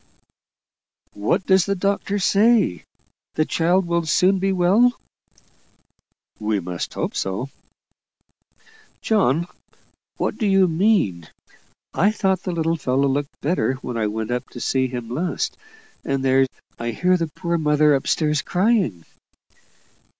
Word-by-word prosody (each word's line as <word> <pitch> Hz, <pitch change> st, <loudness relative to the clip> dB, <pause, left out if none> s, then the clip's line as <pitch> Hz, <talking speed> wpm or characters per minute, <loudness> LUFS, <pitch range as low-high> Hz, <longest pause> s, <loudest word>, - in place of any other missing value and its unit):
"What 140 Hz, -, -1 dB
does 190 Hz, -1 st, +3 dB
the 200 Hz, -, 0 dB
doctor 200 Hz, +1 st, -1 dB
say? 205 Hz, -, +2 dB, 0.5 s
The 155 Hz, -, +2 dB
child 175 Hz, +4 st, +1 dB
will 170 Hz, -1 st, -1 dB
soon 185 Hz, +4 st, +3 dB
be 195 Hz, +1 st, 0 dB
well?" 195 Hz, +7 st, +3 dB, 1.4 s
"We 105 Hz, -1 st, 0 dB
must 90 Hz, -1 st, -5 dB
hope -, -, -3 dB
so." 95 Hz, +8 st, -3 dB, 1.5 s
"John, 170 Hz, -, +2 dB, 0.7 s
what -, -, -2 dB
do 215 Hz, -, +1 dB
you 195 Hz, -1 st, +4 dB
mean? 160 Hz, -, +1 dB, 0.7 s
I 200 Hz, -, +3 dB
thought 190 Hz, -3 st, 0 dB
the 185 Hz, -, -4 dB
little 165 Hz, 0 st, 0 dB
fellow 135 Hz, -1 st, +1 dB
looked 140 Hz, +1 st, -3 dB
better 150 Hz, -4 st, 0 dB
when 125 Hz, -, -5 dB
I 110 Hz, -2 st, 0 dB
went 110 Hz, +2 st, -4 dB
up 125 Hz, +1 st, -3 dB
to 120 Hz, -, -10 dB
see 130 Hz, +1 st, 0 dB
him 120 Hz, -2 st, -6 dB
last. 155 Hz, +10 st, -2 dB, 0.5 s
And 135 Hz, -1 st, -2 dB
there 135 Hz, 0 st, +4 dB, 0.3 s
I 115 Hz, 0 st, -3 dB
hear 180 Hz, +10 st, +1 dB
the 165 Hz, -2 st, -1 dB
poor 170 Hz, +2 st, -3 dB
mother 150 Hz, -1 st, +3 dB
up 135 Hz, -, -1 dB
stairs 150 Hz, -2 st, +1 dB
crying." 180 Hz, -, 0 dB
165 Hz, 135 wpm, -22 LUFS, 130-190 Hz, 1.5 s, you